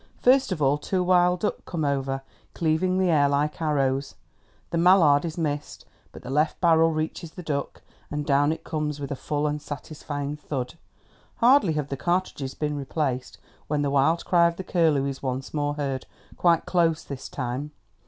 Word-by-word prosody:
First 265 -1 +4
of 160 -5 -1
all 140 +2 +3
two 185 +4 -1
wild 180 0 +3
duck 210 - -2
come 165 -4 -3
over, 135 -1 -1 0.3
cleaving 170 +3 +1
the 185 -2 +2
air 145 -3 +4
like 145 +3 0
arrows. 140 -3 0 0.6
The 170 - 0
mallard 170 -5 +5
is 160 0 -5
missed, 150 -3 -3 0.3
but - - -12
the 130 - -6
left 150 +3 +1
barrel 165 -2 +5
reaches 155 +1 -3
the 180 - -8
duck, 140 -3 -4 0.3
and 150 0 -3
down 145 0 +3
it 160 0 -5
comes 150 -2 -3
with 140 -1 -5
a - - -1
full 150 +2 -2
and 150 0 -1
satisfying 145 -1 -5
thud. 135 -4 -4 0.6
Hardly 240 - +4
have 150 -2 -2
the 140 - -3
cartridges 175 -3 -1
been 150 -1 -2
replaced 135 -2 -3 0.3
when 145 -1 0
the 140 - 0
wild 145 +5 +2
cry 170 -1 +5
of 170 - -2
the 190 - -6
curlew 160 -7 +2
is 135 -1 -4
once 130 0 -4
more 145 -1 -1
heard—quite 145 +4 -1
close 165 -3 +1
this 140 -2 -7
time. 130 +2 -4
150 Hz, 180 wpm, -25 LUFS, 140-170 Hz, 0.6 s, mallard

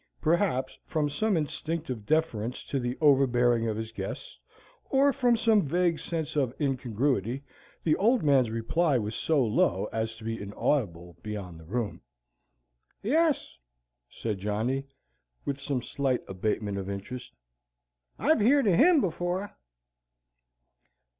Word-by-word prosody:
Perhaps 155 -6 +1
from 150 -2 -1
some 195 +7 +1
instinctive 150 -6 -3
deference 125 -7 0
to 140 - -2
the 125 0 -3
overhearing 125 -5 +4
of 110 -1 -1
his 110 0 -5
guests, - - -6 0.5
or 275 +1 +4
from 245 -3 +3
some 220 -2 +4
vague 170 +2 +1
sense 160 -3 -4
of 130 -4 0
incongruity, 130 - 0 0.4
the 155 -2 +3
Old 235 +2 +3
Man's 135 -5 +4
reply 130 +7 +1
was 105 -1 -2
so 145 -1 +2
low 105 -2 +1
as 110 0 -2
to 110 - -13
be 115 -1 -3
inaudible 100 - -2
beyond 100 -6 -6
the 80 - -13
room. 110 +4 -3 1.0
"Yes," 300 - +1 0.5
said 105 -4 -4
Johnny, 110 +7 -1 0.6
with 140 -1 -2
some 140 -3 -2
slight 135 -2 -1
abatement 100 +1 -2
of 95 0 -5
interest, 125 +6 -6 0.8
"I've 310 -3 +3
heerd 255 +4 +4
o' 185 - +4
HIM 315 - +6
before. 180 +2 -2
135 Hz, 130 wpm, -28 LUFS, 110-170 Hz, 1.0 s, HIM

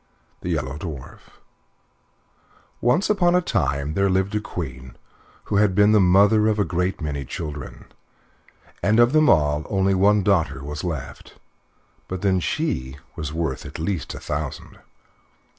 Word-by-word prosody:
THE - - -4
YELLOW 65 +3 -2
DWARF 75 -6 -9 1.4
Once 125 - +2
upon 180 -4 +3
a - - +5
time 75 - -1
there 100 +3 +2
lived 95 +2 0
a 105 - 0
queen 65 - -7 0.5
who 100 - -1
had 100 -3 +3
been 105 +1 +5
the 110 - +5
mother 100 +4 +5
of 110 -1 +1
a 105 - +2
great 90 +2 -2
many 70 -2 -3
children, 75 +1 -7 1.0
and 110 +3 +3
of 120 +3 +5
them 155 -1 +5
all 75 -2 +3
only 95 -1 +2
one 100 +2 +3
daughter 80 -9 +1
was 75 +1 -6
left. 80 -7 -6 0.7
But 95 0 -5
then 95 -2 +2
she 65 -3 -2 0.2
was 75 -1 -5
worth 80 -4 -3
at - - -8
least 80 -2 -3
a - - -7
thousand. - - -5
90 Hz, 150 wpm, -23 LUFS, 75-105 Hz, 1.4 s, a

